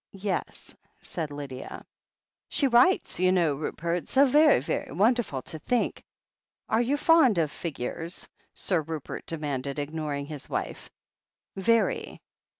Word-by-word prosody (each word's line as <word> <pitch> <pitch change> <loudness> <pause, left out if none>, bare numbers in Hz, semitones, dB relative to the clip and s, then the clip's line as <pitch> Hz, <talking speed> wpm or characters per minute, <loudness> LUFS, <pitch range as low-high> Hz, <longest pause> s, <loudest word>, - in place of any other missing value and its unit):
"Yes," 195 -1 -4 0.2
said 160 -4 -4
Lydia. 140 -3 -7 0.6
"She 285 - +1
writes, 250 - +3
you 185 0 +4
know, 170 -5 +3
Rupert. 170 +4 -3
So 275 +2 +5
ve'y, 300 +4 +6
ve'y 130 - -3
won 205 - +4
derful 180 - -3
to 160 - -7
think 245 +9 -1 0.3
" - - -48
"Are 220 - +4
you 265 +5 +1
fond 290 - +5
of 155 -3 +1
figures?" 165 +2 -5 0.3
Sir 180 -4 +1
Rupert 155 -1 -6
demanded, 140 -4 -3
ignoring 145 -1 -3
his 145 -2 -8
wife. - - -4 0.7
"Very." 230 - +1
170 Hz, 135 wpm, -27 LUFS, 145-235 Hz, 0.7 s, ve'y